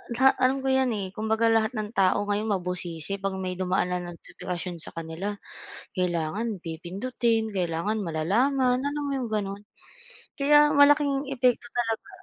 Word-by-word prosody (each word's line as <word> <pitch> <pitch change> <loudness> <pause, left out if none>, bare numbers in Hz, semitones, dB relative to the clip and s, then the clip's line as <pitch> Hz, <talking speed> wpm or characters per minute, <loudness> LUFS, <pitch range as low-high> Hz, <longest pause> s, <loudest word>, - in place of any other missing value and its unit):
la 265 +2 +6
alam 260 +1 +3
ko - - -1
'yan, 265 -1 +3
eh, 195 -2 -3
kumbaga 220 +2 +1
lahat 225 +2 +2
ng 215 -1 -3
tao 195 -2 +2
ngayon 205 +1 -1
mabusisi 180 0 -4
'pag 195 0 -2
may 185 -1 -3
dumaan 185 0 0
na 180 - 0
notipikasyon 175 0 -6
sa - - -8
kanila, 165 +5 -4 0.6
kailangan 180 +4 -1
pipindutin, 220 +7 -1
kailangan 180 +3 -1
malalaman, 245 - +1
alam 285 +1 -2
mo 280 - -2
'yong 250 -3 -3
gano'n, 200 -1 -2 0.8
kaya 295 +1 +6
malaking 285 -1 +4
epekto 250 -2 +1
talaga, 230 -2 -2
210 Hz, 145 wpm, -26 LUFS, 180-250 Hz, 0.8 s, la